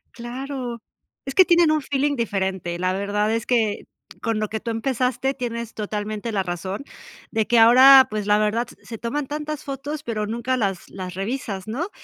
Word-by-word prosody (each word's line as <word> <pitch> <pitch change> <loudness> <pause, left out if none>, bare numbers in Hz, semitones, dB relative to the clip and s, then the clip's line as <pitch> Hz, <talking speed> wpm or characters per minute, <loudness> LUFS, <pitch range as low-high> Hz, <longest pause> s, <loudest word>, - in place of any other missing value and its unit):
Claro, 245 0 -5 0.4
es 270 - -5
que 375 - +9
tienen 345 -3 +4
un 310 -1 +2
feeling 285 +1 0
diferente. 190 -7 -2
La 185 +1 +1
verdad 205 +2 0
es 230 0 -1
que 225 -4 +1 0.4
con 225 -2 -1
lo 215 - -1
que 220 +1 -4
tú 230 - -3
empezaste, 250 +2 0
tienes 235 -3 -5
totalmente 210 +1 -4
la 200 -3 0
razón 185 +5 -4 0.5
de 220 -1 +1
que 240 - +4
ahora, 260 +3 +9
pues 210 -1 -3
la 210 0 +4
verdad, 215 +3 +1
se - - -15
se 230 - -7
toman 260 +6 -3
tantas 300 +1 -5
fotos, 280 +2 -5
pero 215 -3 -2
nunca 235 +4 -1
las 200 -7 -2
las 185 -2 -7
revisas, 195 -1 -4
¿no? 285 - -3
230 Hz, 185 wpm, -23 LUFS, 210-265 Hz, 0.5 s, que